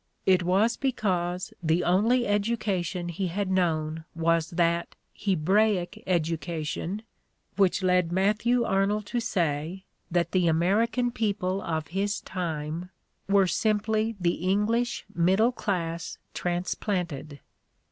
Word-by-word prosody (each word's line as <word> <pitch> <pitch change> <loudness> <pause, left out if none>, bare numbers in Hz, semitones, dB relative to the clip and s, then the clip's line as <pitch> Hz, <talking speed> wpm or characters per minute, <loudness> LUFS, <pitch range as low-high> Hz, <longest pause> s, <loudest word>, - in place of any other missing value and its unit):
It' 185 -1 +5
was 195 +6 +2
because 185 -9 -1
the 165 +1 +2
only 225 +8 +3
education 200 -5 -1
he 180 +3 -2
had 190 +2 -2
known 160 -3 0
was 165 -1 +1
that 170 0 0 0.2
"Hebraic" 195 +2 +1
education 170 +3 -2 0.5
which 190 -1 +2
led 180 -2 +3
Mat 195 +4 +2
thew 240 +1 +2
Arnold 200 +1 +1
to 240 +4 -2
say 175 -3 -1 0.2
that 175 -1 0
the 180 -2 +2
American 220 +9 +2
people 195 -4 -1
of 160 -2 -3
his 200 +4 -1
time 165 -1 -4 0.4
were 200 -1 +5
simply 215 +4 +1
the 175 -2 0
English 230 +5 0
middle 190 +7 +3
class 170 -8 -3 0.2
transplanted. 175 -4 -2
185 Hz, 115 wpm, -27 LUFS, 170-210 Hz, 0.5 s, It